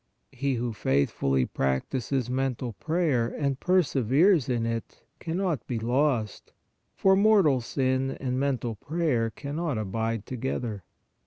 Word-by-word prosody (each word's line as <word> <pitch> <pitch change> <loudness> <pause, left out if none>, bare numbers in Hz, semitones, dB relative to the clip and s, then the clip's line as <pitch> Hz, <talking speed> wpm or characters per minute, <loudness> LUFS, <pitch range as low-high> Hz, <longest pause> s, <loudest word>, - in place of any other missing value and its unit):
He 135 0 -1
who 120 -1 -2
faithfully 70 -5 +1
practises 120 - -1
mental 125 -2 -2
prayer 155 - 0
and 140 0 -2
per 185 0 +3
severes 140 - +3
in 120 -2 0
it 115 -1 -4 0.2
cannot 170 - -2
be 120 - -2
lost, 120 -2 0 0.4
for 190 0 +4
mortal 195 - +4
sin 130 +2 0
and 130 -1 -2
mental 130 -4 -1
prayer 140 -2 -1
cannot 145 +3 -3
abide 110 +1 -2
together. 120 -4 -3
130 Hz, 125 wpm, -27 LUFS, 115-150 Hz, 0.4 s, for